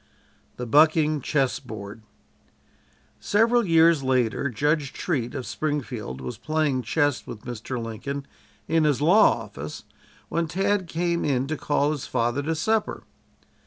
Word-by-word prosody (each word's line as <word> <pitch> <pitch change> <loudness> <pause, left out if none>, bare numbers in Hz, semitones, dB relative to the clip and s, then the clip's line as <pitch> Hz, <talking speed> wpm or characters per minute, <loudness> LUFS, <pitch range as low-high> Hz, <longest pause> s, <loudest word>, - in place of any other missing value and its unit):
THE 125 - -4
"BUCKING" 155 +3 +4
CHESS 135 -1 0
BOARD 110 -4 -9 1.2
Several 230 +3 +3
years 165 -4 +4
later 130 0 +1
Judge 145 +3 0
Treat, 130 -9 -2
of 130 -3 -4
Springfield 120 - -4
was 65 -1 -6
playing 155 -4 0
chess 145 +4 0
with 105 - -8
Mr. 120 +1 -5
Lincoln 125 +5 -5 0.4
in 165 0 +2
his 150 -4 +2
law 165 - +5
office 75 -8 -8 0.4
when 170 0 -1
Tad 195 +2 0
came 170 +1 -1
in 135 -3 +1
to 155 +3 -2
call 145 -1 +1
his 150 -4 -4
father 120 +2 0
to 160 +3 -1
supper. 220 +7 -1
145 Hz, 135 wpm, -25 LUFS, 120-160 Hz, 1.2 s, law